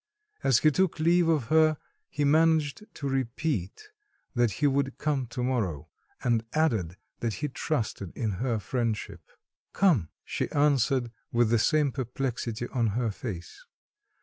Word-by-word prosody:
As 135 -4 +5
he 155 +4 +4
took 185 +1 +1
leave 170 +2 +4
of 160 -5 +2
her, 155 -1 +4 0.3
he 145 - -2
managed 160 +3 +3
to 140 - -4
repeat 135 - -2 0.4
that 120 -4 +2
he 150 - -1
would 140 -1 +1
come 140 -4 -1
to 125 +2 -4
morrow, 110 - -1 0.3
and 115 -2 +2
added 110 - +1 0.2
that 115 -3 -2
he 150 - -2
trusted 115 - -3
in 110 -3 -1
her 120 -3 +1
friendship. 115 +2 -2 0.5
"Come," 155 - +3 0.2
she - - -2
answered 135 -4 +2 0.2
with 120 -1 +2
the 115 - +4
same 150 +3 +3
perplexity 120 -2 -3
on 120 -3 +1
her 120 -3 0
face. 95 - -7
130 Hz, 145 wpm, -28 LUFS, 115-150 Hz, 0.5 s, As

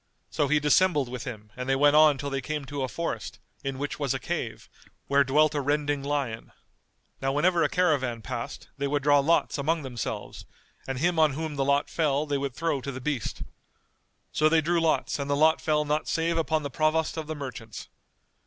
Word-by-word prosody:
So 145 - +1
he 150 +2 +3
dissembled 150 -2 +3
with 125 +1 -6
him 110 -5 -8
and 125 +1 -5
they 135 - +3
went 145 +2 +4
on 155 -2 +6
till 140 0 -4
they 135 0 -1
came 150 +2 -4
to 145 0 -5
a 130 - 0
forest, 170 +6 -4 0.3
in 135 -1 -3
which 145 +2 -4
was 140 -3 0
a - - -3
cave, - - -4 0.4
where 140 0 +4
dwelt 150 +3 +3
a 145 - 0
rending 145 0 0
lion. 140 -5 -3 0.7
Now 135 0 +1
whenever 170 +5 +2
a 150 - +3
caravan 140 - +1
passed, - - -6
they 140 - 0
would 145 0 -1
draw 145 0 +5
lots 150 0 +2
among 160 +2 0
themselves 125 -4 -5 0.4
and 135 -1 -3
him 170 +4 +1
on 155 -3 +4
whom 155 +1 -4
the 140 - 0
lot 140 +1 +2
fell 150 -2 0
they 145 -2 -1
would 135 -2 -3
throw 165 -4 -1
to 140 - -4
the 130 - -6
beast. 130 -3 -3 0.9
So 155 0 +3
they 165 0 +4
drew 170 +2 +1
lots 160 -2 +1
and 140 0 -3
the 140 - +2
lot 160 +2 +4
fell 150 -1 +1
not 150 +1 -1
save 165 +1 0
upon 160 -1 0
the 145 - -4
Provost 155 +2 +1
of 160 -2 -5
the 155 - -4
Merchants. 125 -6 -7
145 Hz, 210 wpm, -27 LUFS, 135-155 Hz, 0.9 s, on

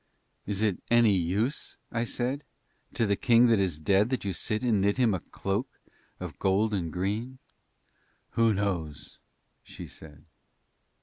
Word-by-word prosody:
"Is 100 +1 -1
it 105 -4 0
any 120 -4 +5
use," 100 - -1
I 115 0 -1
said, 130 +5 -2 0.5
"to 115 - +2
the 100 -1 +2
king 120 +1 +5
that 115 -3 +4
is 90 -6 0
dead 95 +7 +2
that 130 -5 -2
you 95 - -1
sit 110 +6 -2
and 110 -5 +2
knit 100 +3 +2
him 120 -5 +3
a 95 - -1
cloak 100 +9 -3 0.5
of - - -7
gold 100 +3 +2
and 85 -5 -1
green?" 105 +9 -2 0.9
"Who 115 -1 +3
knows?" 90 - -3 0.4
she - - -10
said. 75 -3 -13
100 Hz, 150 wpm, -28 LUFS, 95-115 Hz, 0.9 s, any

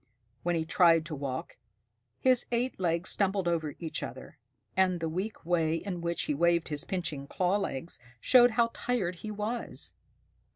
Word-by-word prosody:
When 175 0 0
he 160 -1 -1
tried 165 -1 +4
to 160 -2 -5
walk, 135 -2 -5 0.6
his 255 -2 +3
eight 245 0 -1
legs 170 -1 +1
stumbled 195 -2 +1
over 160 -4 -1
each 165 -2 -4
other, - - -8 0.4
and 185 -2 +3
the 165 - -2
weak 185 +3 -4
way 165 -2 +2
in 180 +1 -4
which 170 0 -1
he - - -1
waved 170 +2 +2
his 150 -2 0
pinching 155 -7 -3
claw 185 +5 +1
legs 165 -7 -4 0.2
showed 245 - +6
how 230 -1 +3
tired 190 -8 -1
he 215 - -7
was. 215 +3 -2
175 Hz, 165 wpm, -30 LUFS, 165-200 Hz, 0.6 s, showed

